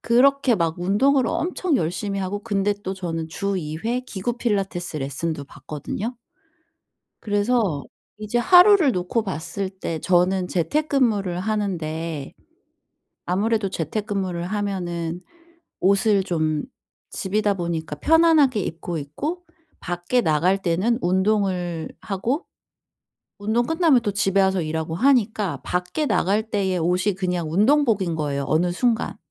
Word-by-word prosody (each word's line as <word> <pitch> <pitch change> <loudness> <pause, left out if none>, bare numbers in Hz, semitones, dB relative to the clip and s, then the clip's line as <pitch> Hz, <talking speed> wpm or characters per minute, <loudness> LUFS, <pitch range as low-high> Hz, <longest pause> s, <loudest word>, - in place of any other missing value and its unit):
그렇게 260 +1 +4
막 165 -3 -1
운동을 230 +8 +2
엄청 345 0 0
열심히 185 +4 -2
하고 200 +2 -3
근데 205 -2 0
또 190 - -3
저는 165 -3 -4
주 200 +4 -2
2 155 -2 -4
회 240 +2 0
기구 240 -1 -4
필라테스 195 -8 -2
레슨도 140 +2 -3
받거든요. 200 - -6 1.0
그래서 205 - +1 0.4
이제 215 +3 -1
하루를 360 - +6
놓고 180 +6 -1
봤을 190 +1 -4
때 175 -4 -5
저는 180 +2 +2
재택근무를 205 - 0
하는데 165 -8 -3 0.9
아무래도 205 +3 0
재택근무를 190 0 -3
하면은 180 -4 -3 0.6
옷을 200 +1 +3
좀 155 -4 -1 0.5
집이다 205 +1 0
보니까 165 -4 -3
편안하게 315 - +4
입고 170 -1 -4
있고 290 - -4 0.4
밖에 175 +8 0
나갈 175 +3 +2
때는 190 +7 +1
운동을 185 -3 0
하고 225 - -2 0.9
운동 220 +4 0
끝나면 325 -5 +3
또 205 -3 -1
집에 195 -1 +2
와서 190 -2 +2
일하고 160 +1 -3
하니까 215 - +2
밖에 180 - -2
나갈 215 -1 +1
때의 190 -3 0
옷이 180 +4 +1
그냥 180 -4 -2
운동복인 210 - +3
거에요 145 -3 -2
어느 175 +3 +1
순간. 235 +4 0
195 Hz, 275 characters per minute, -23 LUFS, 170-225 Hz, 1.0 s, 하루를